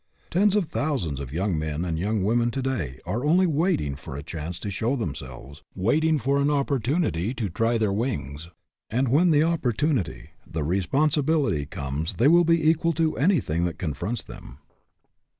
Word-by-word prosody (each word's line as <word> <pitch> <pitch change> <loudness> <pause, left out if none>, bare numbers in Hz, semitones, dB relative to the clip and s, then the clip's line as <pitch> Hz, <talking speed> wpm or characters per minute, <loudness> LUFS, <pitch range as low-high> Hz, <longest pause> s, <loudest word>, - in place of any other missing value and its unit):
Tens 200 +3 +3
of 205 -4 +2
thousands 140 - -2
of 70 -2 -6
young 90 +1 -1
men 80 +2 -2
and 80 -2 -2
young 105 +2 0
women 120 +3 +2
to 130 +2 -3
day 85 - -3
are 120 +4 -2
only 175 +5 +4
waiting 155 - 0
for 70 0 -8
a 70 - -6
chance 80 +2 -6
to 100 +3 -5
show 115 +7 0
themselves, 70 - -6
waiting 155 +11 +2
for 140 +1 +1
an 140 - +2
oppor 140 -2 +1
tunity 120 - -1
to 110 -5 -2
try 115 +7 +1
their 110 -3 +1
wings, 85 - -3 0.4
and 125 +3 0
when 160 +8 +4
the 150 -2 +4
op 165 -1 0
portunity, 120 - -1 0.2
the 80 -2 -2
responsibility, 135 - +1
comes 75 -2 -4
they 120 - +3
will 170 +3 +6
be 165 -1 +3
equal 165 +1 +3
to 160 -1 0
anything 135 - +1
that 85 -2 -3
confronts 100 +7 -3
them. - - -11
115 Hz, 180 wpm, -25 LUFS, -, 0.4 s, will